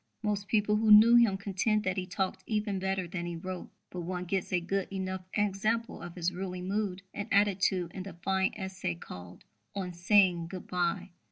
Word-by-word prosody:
Most 205 -1 -1
people 210 -1 +2
who 220 0 +1
knew 220 +3 +9
him 230 -5 +5
contend 205 +2 0
that 185 -1 0
he 185 -2 -3
talked 190 0 -2
even 210 -3 -1
better 190 -1 -1
than 175 0 -4
he 175 - -4
wrote; 185 +2 -6 0.2
but 180 - -5
one 180 +1 -4
gets 190 +1 -2
a 180 - +2
good 190 +2 -2
enough 190 -1 -3
example 215 +3 0
of 175 - -8
his 180 0 -1
ruling 180 0 -5
mood 195 -1 -2
and 205 - -4
attitude 195 -3 +2
in 190 - -5
the 190 0 -7
fine 190 -1 +2
essay 190 - -4
called 90 +1 -10 0.3
_On 180 -2 -3
Saying 175 -1 +3
Good 185 +1 -7
bye. 180 +1 -1
190 Hz, 190 wpm, -30 LUFS, 180-205 Hz, 0.3 s, knew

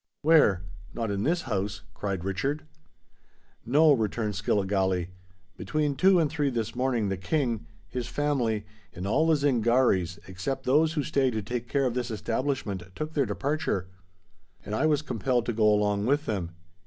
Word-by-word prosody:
"Where? 145 - +5 0.3
Not 115 -3 -2
in 100 -1 -1
this 170 +8 +1
house?" 105 -3 -3
cried 95 -4 -3
Richard. 135 +11 -2 1.0
"No," 150 +6 +5
returned 110 -3 -1
Skilligalee. 95 -2 0 0.5
"Between 150 -2 -1
two 185 +6 +5
and 160 - +3
three 145 -1 0
this 115 -4 -2
morning 125 -4 0
the 95 - -2
King, 120 - -1 0.2
his 125 +2 -4
family, 120 -5 0 0.3
and 90 +1 -6
all 140 +11 +2
the 160 - +5
Zingarees, 120 - +2
except 95 +9 -4
those 155 +5 +3
who 150 -3 0
stay 135 -2 +1
to 110 -3 -3
take 120 +3 -4
care 140 -1 +1
of 125 - 0
this 125 -1 -2
establishment, 115 -1 -2
took 155 +1 -4
their 140 -4 +1
departure; 140 - -1 0.8
and 105 - -5
I 135 +8 +2
was 150 -1 +2
compelled 125 -5 0
to 120 - -1
go 105 -1 +4
along 105 0 +1
with 145 +3 +2
them. 95 -6 -2
120 Hz, 165 wpm, -27 LUFS, 105-145 Hz, 1.0 s, Where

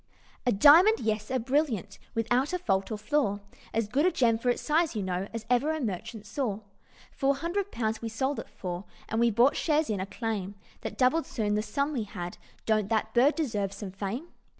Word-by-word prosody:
"A - - +5
diamond? 325 - +7
Yes! 215 -1 -1
a 260 - +1
brilliant, 260 - -1 0.2
Without 245 +7 +1
a - - +2
fault 195 - 0
or 215 - -2
flaw, 215 -2 0 0.3
As 225 -1 0
good 280 +10 +2
a - - +3
gem, 230 -6 +2
for 245 - 0
its 245 - 0
size, 320 -2 +2
you 210 - -1
know, 185 +1 -2
As 230 -1 -6
ever 290 +6 +2
merchant 215 - -4
saw. 220 -4 -2 0.5
Four 275 +1 +1
hundred 350 +7 -2
pounds 220 -1 -2
we 230 - -3
sold 265 +6 -1
it - - -8
for, 180 0 -6 0.2
And 225 - 0
we 235 0 +4
bought 240 +6 +4
shares 310 -5 +1
in 205 - -1
a 190 - -3
claim 205 -2 -3 0.3
That - - -6
doubled 270 +6 +3
soon 210 -3 -1
the 210 - +1
sum 280 +6 -1
we 235 -6 -2
had: 180 -4 -7 0.3
Don't 215 -2 +1
that 220 -1 0
bird 260 +5 +5
deserve 210 - -1
some 200 -1 -7
fame? 205 - -4
230 Hz, 205 wpm, -28 LUFS, 210-280 Hz, 0.5 s, diamond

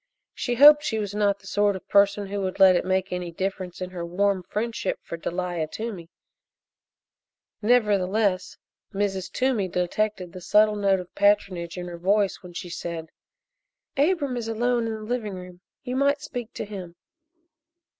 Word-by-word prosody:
She 245 - -2
hoped 295 +3 +9
she 220 - -1
was 205 -2 -3
not 205 -1 +2
the 200 - -21
sort 205 0 +1
of 190 - -9
person 200 0 +3
who 200 +1 -4
would 190 0 -3
let 190 -1 +8
it - - +1
make 190 0 0
any 180 -1 -4
difference 185 0 -4
in 185 0 -4
her 175 -2 -5
warm 190 +3 +1
friendship 220 +5 -3
for - - -6
Delia 175 -1 -3
Toomey; 195 -3 -6 1.5
nevertheless, 205 -4 +2 0.4
Mrs. 195 -2 -1
Toomey 250 -7 +1
detected 180 +1 -2
the 185 - -8
subtle 210 +3 +4
note 195 -2 +2
of 180 - -14
patronage 195 -4 +1
in 180 - -4
her 170 -1 -7
voice 200 +2 +1
when 180 -1 -12
she 175 - -6
said: 170 -2 -6 0.8
"Abram 285 -3 +1
is 230 -2 -4
alone 235 +1 0
in 225 - -2
the 215 - -8
living 215 -3 -3
room 180 -1 -10 0.2
you 250 0 -4
might 280 +2 +2
speak 245 -5 -6
to - - -4
him." 185 -4 -8
200 Hz, 165 wpm, -25 LUFS, 180-220 Hz, 1.5 s, hoped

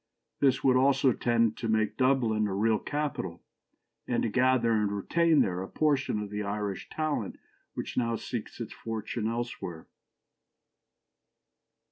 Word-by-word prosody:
This 135 -2 +3
would 130 -1 +5
also 135 0 +4
tend 115 -2 +1
to 115 - -3
make 110 -1 +1
Dublin 120 -5 +2
a 95 - -3
real 110 +1 +2
capital, 145 - -3 0.6
and - - 0
to 115 - +1
gather 125 0 +3
and 105 -2 +1
retain 160 - +3
there 90 -1 0
a 95 - -5
portion 145 -4 +1
of 105 -1 -5
the 105 0 -3
Irish 100 -1 -3
talent 155 -2 -2 0.4
which - - -5
now 115 -2 +1
seeks 115 0 -6
its 115 - -5
fortune 110 0 -4
elsewhere. 115 -8 -4
115 Hz, 140 wpm, -29 LUFS, 105-130 Hz, 0.6 s, would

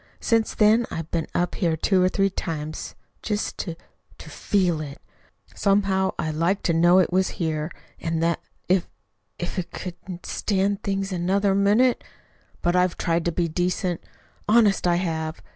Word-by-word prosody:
Since 225 -1 +1
then 220 +2 +4
I've 165 -1 -5
been 165 -2 -1
up 175 0 +1
here 165 -4 0
two 185 +3 +2
or 185 - +4
three 195 +1 +1
times 155 -4 -5 0.3
just 210 -1 -2
to 170 -3 -3 0.4
to - - -11
feel 180 -6 +1
of 155 - -4
it. 140 - -11 0.5
Somehow 195 -1 +1
I 155 -1 -1
liked 170 +6 0
to 170 - +2
know 175 +2 +5
it 185 -1 +3
was 190 0 +1
here, 155 -2 -1 0.3
and 165 0 -1
that, 170 0 +1 0.3
if 180 -1 +2 0.5
if 175 +2 -3
I - - +2
just 175 - -12
couldn't 180 0 -8
stand 200 0 0
things 195 -1 -2
another 190 +3 +1
minute 210 +6 +3 0.6
"But 175 +1 +2
I've 180 -1 +2
tried 170 -1 0
to 170 - +1
be 170 +1 0
decent, 175 +1 -1 0.5
honest 210 -5 +4
I 175 - +3
have. 160 -3 -2
180 Hz, 170 wpm, -24 LUFS, 165-195 Hz, 0.6 s, know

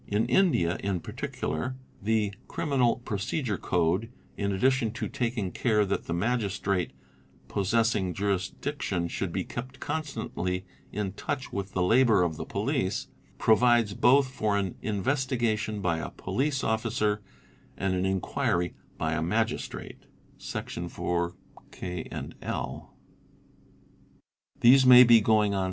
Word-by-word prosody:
In 105 +2 +1
India 120 - +3
in 100 -2 -1
particular, 80 +12 -4 0.3
the 105 -1 +1
Criminal 130 -6 +1
Procedure 105 - -2
Code, 90 +6 0 0.2
in 100 -1 -1
addition 125 +3 +2
to - - -3
taking 115 -6 -2
care 105 -4 +2
that 100 - -2
the 85 - -3
Magistrate 100 -3 0 0.6
possessing 100 -3 +1
jurisdiction 95 - -2
should - - -3
be - - -1
kept 130 +2 -7
constantly 110 - -3 0.3
in 100 -2 -3
touch 130 +5 -4
with 100 -1 -4
the 90 - +1
labour 110 -1 +5
of 85 -3 -1
the - - -5
police, - - -1 0.3
provides 115 -1 +4
both 130 +6 +5
for 110 -5 0
an 95 -3 -1
" - - -24
Investiga 120 +2 0
tion'' 105 -1 -4
by 85 -3 +1
a - - -4
police 140 0 -2
officer 110 -2 0 0.6
and 95 0 0
an 90 0 0
'"'Inquiry" 95 -2 0 0.2
by 80 -1 -1
a 80 - -1
Magistrate 110 +7 -2 0.3
[Section 85 0 -5
4, 85 0 -2 0.4
(k) 90 -2 -5
and - - -6
(l)|]. - - -4 1.7
These 130 +3 +7
may 125 -1 +10
be 115 -2 +7
going 105 -1 +3
on. 100 - 0
105 Hz, 135 wpm, -28 LUFS, 95-120 Hz, 1.7 s, may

